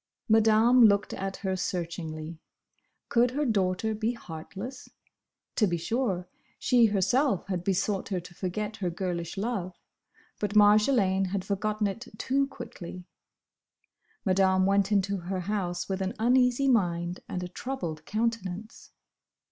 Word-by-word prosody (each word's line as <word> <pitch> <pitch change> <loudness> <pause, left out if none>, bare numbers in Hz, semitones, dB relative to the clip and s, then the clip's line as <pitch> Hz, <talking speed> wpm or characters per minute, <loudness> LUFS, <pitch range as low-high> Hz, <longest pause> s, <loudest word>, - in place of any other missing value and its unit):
Madame 225 +2 +6
looked 200 -1 +3
at 195 0 -4
her 190 0 +1
searchingly. 165 -3 -4 0.7
Could 240 +1 +3
her 290 +4 -1
daughter 205 -1 +1
be 220 +2 -1
heartless? 195 +5 -8 0.7
To 215 - +4
be 175 -2 0
sure, 185 -1 -1 0.3
she 240 -2 +4
herself 215 +3 +1
had 180 -3 -2
besought 195 +2 0
her 190 -3 -1
to 175 +1 -12
forget 210 +4 -4
her 185 -4 -1
girlish 175 0 -4
love, 195 -4 -2 0.6
but 210 0 -2
Marjolaine 205 -2 +5
had 190 0 -3
forgotten 210 +1 -1
it 205 +5 -3
too 275 +4 +1
quickly. 180 -9 -9 1.2
Madame 190 -1 +3
went 200 +1 +2
into 200 -1 +2
her 185 +1 -4
house 180 -2 -2
with 195 0 -2
an 190 +3 -2
uneasy 250 +3 +3
mind 175 -7 +1
and 180 - -3
a - - -4
troubled 180 -7 -5
countenance. 220 -2 -3
200 Hz, 130 wpm, -28 LUFS, 180-225 Hz, 1.2 s, Madame